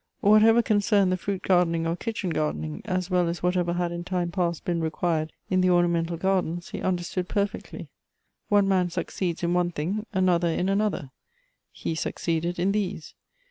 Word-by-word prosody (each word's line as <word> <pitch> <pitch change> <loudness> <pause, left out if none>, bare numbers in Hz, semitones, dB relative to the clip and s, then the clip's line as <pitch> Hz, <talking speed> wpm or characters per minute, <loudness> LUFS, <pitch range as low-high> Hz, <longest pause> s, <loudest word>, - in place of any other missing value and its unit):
Whatever 220 +2 +6
concerned 205 -3 +3
the - - +2
fruit 190 +1 -4
gardening 170 -3 +2
or 165 +1 0
kitchen 195 -1 -3
gardening, 155 0 -2
as 185 -2 -2
well 180 -1 +3
as 170 +1 -4
what 180 +1 +2
ever 175 -1 +1
had 175 0 -1
in 170 0 -4
time 175 -1 -2
past 170 -3 -1
been 170 -2 0
required 160 0 -1 0.2
in 185 0 +3
the 185 - +3
ornamental 170 -1 +2
gardens, 175 -2 -1
he - - -6
understood 180 0 -2
perfectly. 200 0 -3 0.6
One 205 -1 +4
man 185 -2 +2
succeeds 175 0 -3
in 170 0 +1
one 175 0 +2
thing, 185 +7 -3
another 180 -3 +2
in 180 +3 0
another; 195 -9 0 0.6
he - - -4
succeeded 170 +2 -2
in 185 +3 +1
these. 195 -5 -3
180 Hz, 175 wpm, -26 LUFS, 170-195 Hz, 0.6 s, Whatever